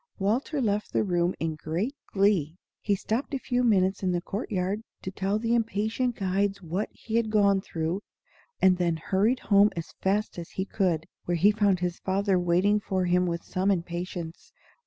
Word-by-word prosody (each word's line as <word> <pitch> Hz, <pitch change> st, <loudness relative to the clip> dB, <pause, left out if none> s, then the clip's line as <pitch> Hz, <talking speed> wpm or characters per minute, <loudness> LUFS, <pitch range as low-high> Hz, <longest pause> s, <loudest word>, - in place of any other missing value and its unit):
Walter 235 Hz, +9 st, 0 dB
left 210 Hz, -2 st, -1 dB
the -, -, +2 dB
room 175 Hz, -2 st, +1 dB
in 160 Hz, -1 st, -1 dB
great 165 Hz, -, -3 dB, 0.2 s
glee. 190 Hz, -6 st, +2 dB, 0.2 s
He 205 Hz, -, +1 dB
stopped 225 Hz, +8 st, -2 dB
a -, -, +1 dB
few 250 Hz, -1 st, -1 dB
minutes 190 Hz, -5 st, +2 dB
in 185 Hz, -2 st, 0 dB
the 175 Hz, -, +1 dB
court 200 Hz, +5 st, -5 dB
yard 195 Hz, +1 st, -1 dB, 0.2 s
to 190 Hz, -, -4 dB
tell 195 Hz, +2 st, -1 dB
the 230 Hz, +1 st, 0 dB
impatient 230 Hz, +2 st, 0 dB
guides 195 Hz, +1 st, 0 dB
what 180 Hz, +4 st, -3 dB
he 230 Hz, 0 st, -3 dB
had 230 Hz, -2 st, +1 dB
gone 200 Hz, -2 st, +3 dB
through, 165 Hz, +2 st, -3 dB, 0.6 s
and 185 Hz, -1 st, +5 dB
then 170 Hz, -2 st, +1 dB
hurried 200 Hz, +9 st, +1 dB
home 205 Hz, 0 st, +5 dB
as 165 Hz, -1 st, -5 dB
fast 200 Hz, 0 st, 0 dB
as 170 Hz, -, -7 dB
he 190 Hz, -, -3 dB
could, 175 Hz, -6 st, 0 dB, 0.2 s
where 175 Hz, 0 st, 0 dB
he 200 Hz, +6 st, +5 dB
found 205 Hz, -4 st, +2 dB
his 180 Hz, -1 st, -2 dB
father 195 Hz, 0 st, +1 dB
waiting 180 Hz, +4 st, +3 dB
for 190 Hz, -2 st, -1 dB
him 180 Hz, +1 st, +2 dB
with 170 Hz, -1 st, -3 dB
some 190 Hz, +2 st, -1 dB
impatience. 175 Hz, -, -3 dB
195 Hz, 185 wpm, -27 LUFS, 175-210 Hz, 0.6 s, and